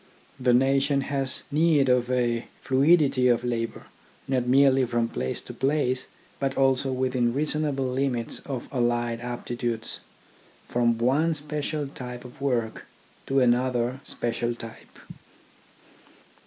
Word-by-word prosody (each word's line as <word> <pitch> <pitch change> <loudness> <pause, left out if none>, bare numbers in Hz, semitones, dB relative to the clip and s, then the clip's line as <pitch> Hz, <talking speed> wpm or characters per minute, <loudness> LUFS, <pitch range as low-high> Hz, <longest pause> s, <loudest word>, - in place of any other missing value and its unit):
The 125 -1 +3
nation 135 +2 +3
has 135 -1 -2
need 150 -2 +3
of 125 -1 +2
a 120 -2 0 0.2
fluidity 135 -1 +4
of 120 -1 +3
labour, 115 -2 -2 0.4
not 130 -2 0
merely 135 +1 +5
from 120 -1 0
place 65 - -3
to - - -9
place, 130 -1 0 0.3
but 135 -1 -1
also 135 0 +2
within 130 -2 0
reasonable 150 -2 0
limits 125 -2 -1
of 130 -4 -4
allied 120 -2 0
aptitudes, 120 -1 -3 0.7
from 120 -1 +1
one 145 +8 +2
special 150 0 -3
type 125 -2 -8
of 125 +2 -13
work 120 -5 -1 0.4
to 135 0 +2
another 125 0 +1
special 120 0 -2
type. 115 -1 -11
130 Hz, 120 wpm, -26 LUFS, 120-135 Hz, 0.7 s, merely